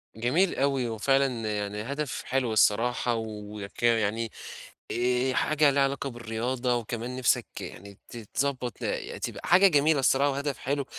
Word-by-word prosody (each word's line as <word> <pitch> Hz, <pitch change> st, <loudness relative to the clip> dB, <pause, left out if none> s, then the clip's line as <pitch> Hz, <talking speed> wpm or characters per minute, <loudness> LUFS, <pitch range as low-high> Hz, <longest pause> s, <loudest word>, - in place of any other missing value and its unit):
جميل 150 Hz, +12 st, +1 dB
أوي 135 Hz, -3 st, +1 dB
وفعلًا 115 Hz, -1 st, +1 dB
يعني 105 Hz, 0 st, -3 dB
هدف 140 Hz, +3 st, -4 dB
حلو 125 Hz, -3 st, 0 dB
الصراحة 115 Hz, +3 st, +2 dB
ويكا 105 Hz, -1 st, -5 dB
يعني، 110 Hz, +2 st, -1 dB, 0.6 s
آآ 125 Hz, +2 st, +1 dB
حاجة 155 Hz, +1 st, +3 dB
ليها 140 Hz, 0 st, +3 dB
علاقة 140 Hz, 0 st, -1 dB
بالرياضة 120 Hz, +2 st, -2 dB
وكمان 120 Hz, +1 st, -4 dB
نِفسك 130 Hz, -2 st, +2 dB, 0.2 s
يعني 100 Hz, +1 st, -9 dB
تتضّبط 125 Hz, +2 st, -3 dB
ل -, -, -3 dB
تبقى -, -, -5 dB
حاجة 190 Hz, +3 st, +7 dB
جميلة 150 Hz, -2 st, +3 dB
الصراحة 135 Hz, +2 st, +3 dB
وهدف 140 Hz, -1 st, -2 dB
حلو. 140 Hz, +1 st, -2 dB
125 Hz, 135 wpm, -27 LUFS, 110-140 Hz, 0.6 s, حاجة